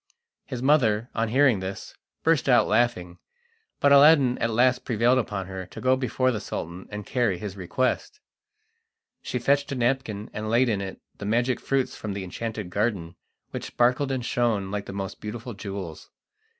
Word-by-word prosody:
His 125 -1 -5
mother, 120 -6 +3
on 115 0 0
hearing 130 -3 +4
this, 95 +1 -6 0.3
burst 160 -5 +2
out 125 - +5
laughing, 105 -6 0 0.6
but 140 - +4
Aladdin 140 -3 +7
at 115 - +1
last 125 +3 +3
prevailed 120 +2 +2
upon 100 -5 -3
her 95 -1 -7
to - - -10
go 130 +1 +3
before 130 0 0
the 110 - -2
Sultan 90 -2 -6
and 105 -1 -6
carry 120 -8 0
his 100 +1 -6
request. 130 - -2 1.0
She - - -3
fetched 140 +4 +1
a - - -1
napkin 120 -4 -1
and 110 +1 -4
laid 120 +2 +3
in 105 -3 0
it 95 -1 -6 0.2
the 100 - -5
magic 120 +4 +1
fruits 135 -1 -1
from 105 -2 -5
the 100 -1 -4
enchanted 105 0 -5
garden, 100 -5 -1 0.4
which - - -5
sparkled 125 +3 +1
and 130 -3 -2
shone 110 -6 0
like 100 0 -4
the - - -5
most 95 0 -5
beautiful 115 +3 -6
jewels. 95 -5 -7
115 Hz, 175 wpm, -25 LUFS, 100-130 Hz, 1.0 s, Aladdin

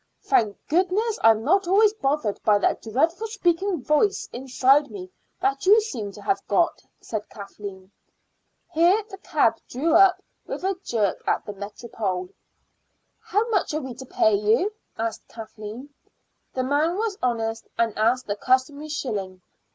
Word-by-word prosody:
"Thank 220 - +2
goodness 380 +7 +1
I'm 225 0 +5
not 370 +7 +2
always 410 +3 +5
bothered 275 - -1
by 210 -1 +4
that 205 - 0
dreadful 325 - 0
speaking 375 - 0
voice 315 +8 +1
inside 265 +3 +2
me 185 -4 -9 0.3
that 275 +5 -1
you 425 +3 +8
seem 235 - -4
to 205 - -12
have 195 -1 0
got," 335 +12 +1 0.2
said 215 -2 -5
Kathleen. 200 -2 -9 0.8
Here 355 +7 +4
the 385 - -9
cab 230 - +1
drew 305 +6 0
up 375 +1 +6 0.3
with - - -5
a 385 +1 0
jerk 210 -5 0
at - - 0
the 205 - -6
Métropole. 200 -2 -5 0.9
"How 425 +4 0
much 395 -8 0
are 310 - -1
we 260 -2 -6
to 260 - -10
pay 220 - +2
you?" 220 - +2 0.2
asked 225 -1 -4
Kathleen. 225 +4 -9 0.6
The 255 - 0
man 300 +7 +1
was 430 -2 -2
honest, 225 -2 -1
and 230 -2 +1
asked 235 +4 +2
the 205 - -2
customary 260 +6 0
shilling. 195 -10 -4
260 Hz, 150 wpm, -24 LUFS, 215-350 Hz, 0.9 s, you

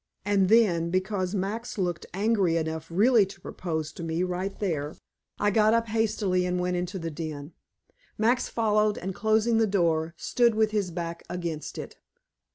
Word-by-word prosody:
And 200 -2 +2
then, 185 -7 +4
because 185 +1 -1
Max 210 +6 -3
looked 175 -4 -2
angry 195 -4 +2
enough 160 0 -3
really 215 +6 +5
to 195 0 -12
propose 160 -4 -4
to - - -9
me 165 +1 -1
right 185 +2 -3
there, 155 -7 -2 0.4
I 205 0 +2
got 215 +2 +4
up 230 -1 0
hastily 210 -4 +1
and 180 0 -1
went 180 0 0
into 180 +2 -3
the 165 -2 -4
den. 155 -1 -6 0.6
Max 235 +4 +2
followed, 215 -2 +2
and 190 +1 -4
closing 220 +3 +2
the 225 - +3
door, 165 -4 +1
stood 235 +2 +2
with 215 -1 +2
his 205 -4 0
back 170 0 -5
against 170 -4 -4
it. - - -7
185 Hz, 165 wpm, -27 LUFS, 170-215 Hz, 0.6 s, really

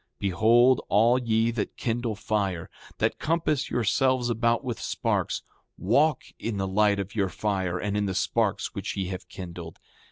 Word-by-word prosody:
7:11 - - -50
Behold 115 +6 +4
all 115 +5 +4
ye 115 -1 +1
that 110 -3 -4
kindle 115 -1 -2
fire, 100 -5 -2 0.3
that - - 0
compass 160 -3 0
yourselves 125 +2 +1
about 115 +2 +1
with 125 -3 -4
sparks, - - -1 0.3
walk 145 +11 +2 0.2
in 115 -3 -3
the 95 0 -1
light 100 +1 +3
of 100 0 -4
your 100 -3 0
fire 95 -3 -1
and 105 +2 -2
in 105 -1 0
the 95 - -2
sparks - - 0
which - - -4
ye 95 -2 -2
have 95 0 -7
kindled. 85 -3 -8
105 Hz, 165 wpm, -26 LUFS, 95-120 Hz, 0.3 s, Behold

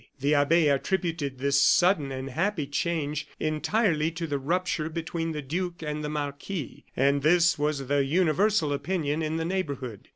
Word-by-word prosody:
The 140 +3 +2
abbe 150 +3 +4
attributed 150 -1 -1
this 140 +1 +2
sudden 175 -4 +4
and 130 +1 -5
happy 170 +1 -1
change 150 0 -2
entirely 155 +1 +1
to 165 0 -5
the 145 -3 -2
rupture 165 +1 -1
between 165 0 -3
the 150 -2 -4
duke 175 +4 -3
and 150 0 -3
the 150 - -3
marquis, 145 +1 -5
and 140 +2 +3
this 170 +2 +4
was 145 -2 -1
the 140 0 +2
universal 165 +2 +2
opinion 155 -1 -1
in 155 0 -1
the 165 - -2
neighborhood. 140 - -4
155 Hz, 160 wpm, -27 LUFS, 140-170 Hz, -, abbe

